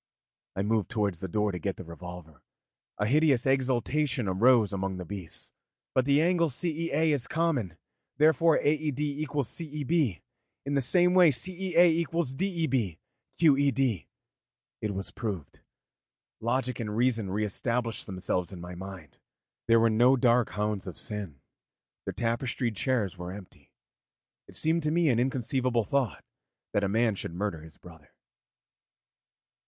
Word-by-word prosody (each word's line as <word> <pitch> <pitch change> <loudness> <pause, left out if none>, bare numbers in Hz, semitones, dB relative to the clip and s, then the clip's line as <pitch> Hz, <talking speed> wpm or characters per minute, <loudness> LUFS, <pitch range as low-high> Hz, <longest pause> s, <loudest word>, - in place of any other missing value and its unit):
I 95 - -1
moved 110 -1 0
towards 105 -7 -1
the 95 - -4
door 105 +3 0
to 90 - -5
get 100 0 -2
the - - -7
revolver; 85 -2 -10 0.6
a 105 - 0
hideous 140 0 +3
exultation 135 0 +1
arose 110 +2 +4
among 95 -1 -2
the 90 - -6
beasts. 90 -2 -7 0.4
'But 130 - +2
the 140 +2 +4
angle 170 -1 +2
CEA 160 +1 0
is 125 -4 0
common, 140 - -1 0.4
therefore 155 +2 +4
AED 150 -2 0
equals 145 -2 -1
CEB. 150 - -1 0.4
In 140 - -2
the 140 - +2
same 180 +7 +4
way 180 -3 +7
CEA 175 +6 +2
equals 165 -3 -1
DEB. 135 - -1 0.4
QED.' 135 - +3 0.7
It 105 -2 -2
was 95 0 -5
proved. 100 - -5 0.8
Logic 125 +2 -1
and 105 -2 -3
reason 115 -4 +1
re 105 +3 0
established 115 +2 -2
themselves 90 -2 -2
in 95 - -8
my 90 +1 -8
mind, 90 -6 -10 0.5
there 115 0 +5
were 115 0 +4
no 120 +4 +5
dark 120 -2 +3
hounds 105 -2 -2
of 90 - -7
sin, 100 -10 -6 0.7
the - - -1
tapestried 115 0 -1
chairs 105 -6 -1
were 90 0 -5
empty. 95 -1 -12 0.8
It - - -16
seemed 160 +2 +1
to 150 - 0
me 165 0 +2
an 120 -3 +2
inconceivable 125 -1 0
thought 135 -4 -1 0.5
that 100 - +1
a 100 - +1
man 110 +2 +2
should 85 -3 -6
murder 95 -4 -3
his 80 0 -14
brother. 80 -5 -16
120 Hz, 145 wpm, -28 LUFS, 100-145 Hz, 0.8 s, way